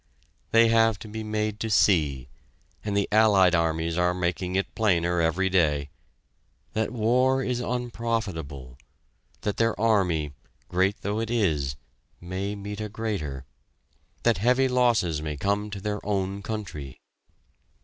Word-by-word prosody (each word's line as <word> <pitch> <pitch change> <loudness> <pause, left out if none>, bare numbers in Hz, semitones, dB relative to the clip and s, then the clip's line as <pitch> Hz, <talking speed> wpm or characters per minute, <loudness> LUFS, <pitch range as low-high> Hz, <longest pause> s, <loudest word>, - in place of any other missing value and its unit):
They 115 0 +5
have 115 -1 +4
to 95 - -10
be 110 +1 -6
made 105 0 -2
to 110 - -2
see 75 - +3 0.6
and 105 -1 -1
the 100 - +1
Allied 105 -4 +5
armies 80 0 0
are 90 0 +2
making 90 +1 -2
it 95 - -1
plainer 90 -5 +2
every 85 +4 +1
day 75 -6 +1 0.8
that 110 0 0
war 125 +3 +2
is 125 -1 -1
unprofitable; 110 - -3 0.6
that 105 - -2
their 115 -2 +1
army, 90 -10 +1 0.4
great 95 +3 +1
though 105 +2 -2
it 115 0 -2
is, 80 - 0 0.4
may 95 +3 -4
meet 100 +1 -6
a 105 - -4
greater; 90 - -4 0.8
that 115 -5 +3
heavy 125 +5 +3
losses 120 -11 +2
may 75 -1 -4
come 100 +5 -1
to 100 -1 -6
their 105 +1 -3
own 100 -1 -2
country. 80 - -6
100 Hz, 140 wpm, -26 LUFS, 85-110 Hz, 0.8 s, They